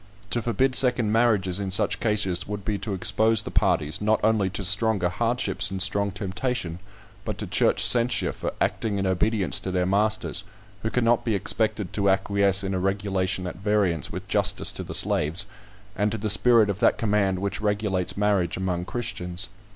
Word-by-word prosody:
To 120 - +1
forbid 130 +3 0
second 125 -4 +2
marriages 105 -5 +2
in 100 -1 -3
such 95 - 0
cases 100 -4 -1
would 105 -1 -6
be 105 -2 -2
to 100 0 -4
expose 110 +3 +2
the - - -7
parties, 75 +5 0
not 110 +1 +1
only 110 -3 +2
to 100 +1 -5
stronger 100 -1 +2
hardships 100 -2 0
and 95 0 -5
strong 100 +2 +3
temptation, 95 -1 -4 0.4
but - - -5
to - - -4
church - - +3
censure 120 -1 +4
for - - -5
acting 105 -3 -1
in 100 - -2
obedience 95 +1 0
to 95 - -6
their 90 -1 0
masters, 105 +1 0 0.4
who 110 - -2
cannot 120 0 +1
be 115 -3 -1
expected 105 -1 -1
to 100 -1 +1
acquiesce 100 0 +2
in 95 0 -3
a 95 - -1
regulation 95 -1 -2
at 90 - -6
variance 100 -5 0
with - - -7
justice - - +1
to - - -7
the - - -4
slaves, 75 +4 +3 0.5
and 105 +2 0
to 110 - -3
the 105 0 +1
spirit 110 0 +4
of 100 - -7
that - - +3
command 105 -4 0
which 100 +2 -3
regulates 105 -4 -1
marriage 100 -4 0
among 90 -2 -3
Christians. 95 -5 -4
100 Hz, 180 wpm, -24 LUFS, 95-110 Hz, 0.5 s, censure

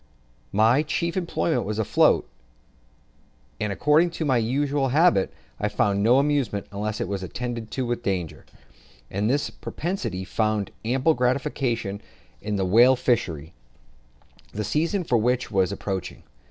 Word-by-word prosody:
My 115 +6 +4
chief 165 +2 -2
employment 170 -2 0
was 105 0 -3
afloat, 110 - +3 1.3
and 105 - -1
according 150 - +3
to 160 - -1
my 130 -4 +3
usual 135 +4 0
habit, 150 - +3 0.3
I - - 0
found 100 -1 +1
no 120 +5 +5
amusement 140 -8 0
unless 105 +1 -3
it - - -2
was 100 0 -3
attended 120 +4 -5
with 120 -2 -1
danger; 90 -7 -3 0.7
and 100 +3 0
this 145 +3 0
propensity 115 - -4
found 110 -1 -1
ample 130 +7 +2
gratification 125 -5 -1 0.4
in 105 -1 -3
the 95 -1 0
whale 120 +7 +6
fishery, 85 - -1 1.0
the 105 - -3
season 170 - 0
for 120 -7 +2
which 125 +3 0
was 95 -3 +2
just 100 - -5
approaching. 95 -2 -4
120 Hz, 140 wpm, -24 LUFS, 100-140 Hz, 1.3 s, whale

